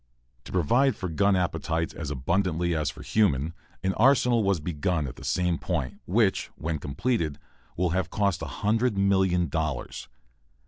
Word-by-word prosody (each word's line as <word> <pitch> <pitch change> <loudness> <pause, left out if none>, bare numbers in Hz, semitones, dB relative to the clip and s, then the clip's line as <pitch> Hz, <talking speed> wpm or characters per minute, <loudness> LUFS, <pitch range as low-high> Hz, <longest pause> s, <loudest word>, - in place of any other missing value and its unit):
To - - -9
provide 120 - +3
for 95 - -4
gun 100 +5 +2
appetites 85 -2 -1
as 75 -4 -5
abundantly 85 +4 0
as 75 -3 0
for 65 - -9
human, 85 -8 +1 0.3
an 95 0 +1
arsenal 125 -1 +4
was 100 -3 +2
begun 80 0 -1
at 65 - -6
the - - -12
same 90 -2 0
point, 65 - -3
which, 100 +1 +2
when 80 -1 -3
completed, 80 - -1 0.4
will 90 -1 +1
have 95 +2 0
cost 100 -4 0
a - - -3 0.2
hundred 110 +1 +2
million 95 -3 +2
dollars. 75 -4 -3
90 Hz, 155 wpm, -27 LUFS, 80-100 Hz, 0.4 s, arsenal